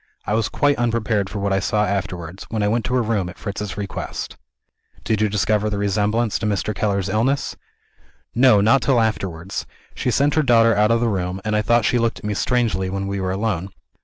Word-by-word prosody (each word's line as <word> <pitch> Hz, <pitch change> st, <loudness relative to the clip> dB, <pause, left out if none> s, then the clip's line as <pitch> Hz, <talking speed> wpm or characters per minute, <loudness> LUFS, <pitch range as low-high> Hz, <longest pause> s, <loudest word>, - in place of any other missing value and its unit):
I -, -, -1 dB
was 110 Hz, 0 st, +1 dB
quite 145 Hz, 0 st, +2 dB
unprepared 115 Hz, -4 st, 0 dB
for 105 Hz, -, -6 dB
what 100 Hz, -1 st, 0 dB
I 95 Hz, -, +2 dB
saw 105 Hz, +2 st, +1 dB
afterwards, 90 Hz, -2 st, -4 dB
when 110 Hz, -2 st, -1 dB
I -, -, +2 dB
went 115 Hz, +1 st, 0 dB
to 125 Hz, -, -1 dB
her 125 Hz, -, +2 dB
room 105 Hz, -5 st, -1 dB
at 90 Hz, -, -11 dB
Fritz's 100 Hz, -2 st, -5 dB
request. 100 Hz, -1 st, -5 dB, 0.7 s
"Did 110 Hz, -2 st, 0 dB
you 110 Hz, -, +2 dB
discover 105 Hz, +1 st, +1 dB
the 105 Hz, -, -2 dB
resemblance 105 Hz, +3 st, 0 dB
to 110 Hz, -, -1 dB
Mr. 105 Hz, +1 st, -1 dB
Keller's 100 Hz, -3 st, -1 dB
illness?" 115 Hz, +8 st, 0 dB, 0.8 s
"No 120 Hz, -4 st, +5 dB
not 115 Hz, +6 st, +4 dB
till 130 Hz, -4 st, +3 dB
afterwards. 95 Hz, -5 st, -2 dB, 0.3 s
She -, -, -2 dB
sent 140 Hz, +4 st, +2 dB
her 155 Hz, -, +3 dB
daughter 115 Hz, -4 st, +4 dB
out 105 Hz, +1 st, +3 dB
of 115 Hz, 0 st, +2 dB
the 120 Hz, -, +2 dB
room; 95 Hz, -3 st, -2 dB
and 105 Hz, 0 st, 0 dB
I 105 Hz, -, +2 dB
thought 115 Hz, +1 st, +2 dB
she 120 Hz, -, +2 dB
looked 115 Hz, -1 st, 0 dB
at -, -, -10 dB
me 105 Hz, -, -1 dB
strangely, 105 Hz, -5 st, 0 dB
when 95 Hz, +1 st, -3 dB
we 100 Hz, 0 st, -3 dB
were 95 Hz, -, -1 dB
alone. 95 Hz, -2 st, -2 dB
105 Hz, 220 wpm, -21 LUFS, 100-115 Hz, 0.8 s, No